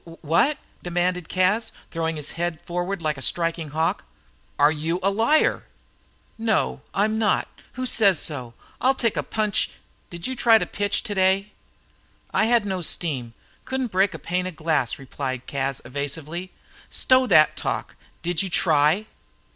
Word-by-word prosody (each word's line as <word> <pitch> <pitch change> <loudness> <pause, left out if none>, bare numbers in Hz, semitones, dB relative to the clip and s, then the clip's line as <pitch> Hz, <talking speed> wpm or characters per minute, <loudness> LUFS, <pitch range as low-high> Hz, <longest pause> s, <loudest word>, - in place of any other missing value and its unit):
"Wha 160 +2 +4
at?" 300 - -3 0.2
demanded 175 -1 -1
Cas, 190 +5 +1 0.2
throwing 165 -1 -1
his 150 -1 -4
head 170 -1 -2
forward 175 +1 -3
like 150 -3 -1
a - - -9
striking 165 0 0
hawk. 160 +3 0 0.5
"Are 145 +1 +5
you 160 +3 -2
a 195 - +3
liar?" 230 +10 +2 0.7
"No, 225 -1 0
I'm 215 +2 +1
not. 215 -2 +2 0.3
Who 255 +1 -3
says 200 -7 +4
so? 125 -7 -3 0.3
I'll 265 +1 +4
take 230 -4 0
a - - +1
punch 215 -2 0 0.2
" - - -37
"Did 170 -1 -7
you 260 - -2
try 230 -2 +6
to - - -1
pitch 205 -1 -1
today?" 195 0 +1 0.8
"I 215 - +3
had 235 -2 +3
no 190 -2 -2
steam; 135 -9 -1 0.3
couldn't 260 -3 -2
break 190 +2 +2
a - - -4
pane 180 +1 -2
of 185 - -7
glass," 155 -6 0
replied 130 -1 -5
Cas, 135 -1 -3
evasively. 145 +7 -4 0.4
"Stow 255 0 +3
that 155 -7 +5
talk. - - -3 0.3
Did 175 -1 +1
you 195 - -2
try?" 160 +3 +3
175 Hz, 160 wpm, -24 LUFS, 155-205 Hz, 0.8 s, try